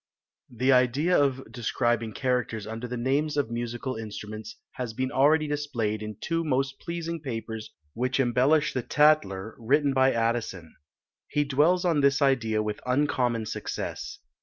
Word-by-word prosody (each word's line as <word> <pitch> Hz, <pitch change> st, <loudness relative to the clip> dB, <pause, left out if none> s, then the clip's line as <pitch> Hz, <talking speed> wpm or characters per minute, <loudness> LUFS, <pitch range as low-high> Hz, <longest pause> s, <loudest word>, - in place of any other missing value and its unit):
The 130 Hz, +3 st, +1 dB
idea 130 Hz, +7 st, +3 dB
of 135 Hz, -2 st, +2 dB
describing 120 Hz, -1 st, -1 dB
characters 125 Hz, -5 st, -1 dB
under 115 Hz, +3 st, -5 dB
the 125 Hz, +1 st, -4 dB
names 140 Hz, +5 st, 0 dB
of 140 Hz, -5 st, 0 dB
Musical 120 Hz, +2 st, -3 dB
Instruments 110 Hz, 0 st, -7 dB, 0.2 s
has 125 Hz, -4 st, -5 dB
been 130 Hz, +1 st, -1 dB
already 155 Hz, +3 st, +4 dB
displayed 125 Hz, -8 st, -2 dB
in 105 Hz, -1 st, -6 dB
two 165 Hz, +5 st, -1 dB
most 135 Hz, -2 st, -1 dB
pleasing 170 Hz, 0 st, -4 dB
papers 115 Hz, -5 st, -5 dB, 0.2 s
which 125 Hz, +3 st, -1 dB
embellish 135 Hz, +5 st, +3 dB
the 130 Hz, -, -1 dB
Tatler, 115 Hz, -9 st, +2 dB
written 140 Hz, +4 st, +2 dB
by 130 Hz, 0 st, +4 dB
Addison. 115 Hz, -8 st, -2 dB, 0.5 s
He 145 Hz, 0 st, +1 dB
dwells 155 Hz, +6 st, +2 dB
on 165 Hz, -4 st, +3 dB
this 140 Hz, 0 st, +3 dB
idea 115 Hz, -6 st, +2 dB
with 105 Hz, -1 st, -4 dB
uncommon 125 Hz, -3 st, +1 dB
success. -, -, -5 dB
130 Hz, 145 wpm, -27 LUFS, 115-145 Hz, 0.5 s, already